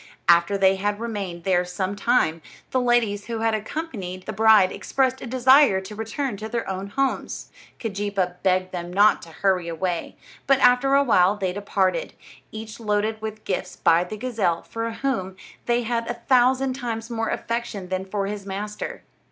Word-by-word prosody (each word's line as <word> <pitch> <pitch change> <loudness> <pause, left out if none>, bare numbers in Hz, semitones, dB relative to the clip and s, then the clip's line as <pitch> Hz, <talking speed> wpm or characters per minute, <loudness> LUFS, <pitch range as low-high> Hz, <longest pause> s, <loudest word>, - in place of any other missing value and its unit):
After 170 +3 +5
they 190 0 +4
had 205 +2 -1
remained 200 -7 -4
there 180 -1 +2
some 185 +2 -3
time, 195 -7 +1 0.3
the 255 - +1
ladies 230 -4 +1
who 230 -1 -4
had 225 0 +2
accompanied 215 - -5
the - - -4
bride 215 -3 +5
expressed 260 -1 -1
a - - -6
desire 260 -3 +5
to 190 +2 -9
return 225 +2 -3
to 220 +2 -6
their 235 0 -3
own 190 +1 -4
homes. 270 +6 -2 0.3
Keejeepaa 200 -4 -2
begged 185 -1 +1
them 175 -1 -5
not 205 +3 +4
to 170 - -11
hurry 180 +1 0
away, 170 +1 -3 0.3
but 275 0 +5
after 250 +2 +4
a 280 - +5
while 195 -6 +4
they 190 -3 -2
departed, 190 -3 -1 0.4
each 220 +1 -8
loaded 215 0 -1
with 215 0 -6
gifts 185 -1 -3
by 165 +1 +3
the 195 +4 -7
gazelle, 210 -8 -1
for 230 0 -4
whom 225 -6 -2 0.3
they 240 0 +2
had 230 0 -2
a 240 - -2
thousand 255 +2 +3
times 235 -3 -5
more 225 -1 -1
affection 230 -5 -3
than 185 0 -2
for 195 +1 -3
his 205 0 -4
master. 205 +2 -5
210 Hz, 175 wpm, -24 LUFS, 190-235 Hz, 0.4 s, After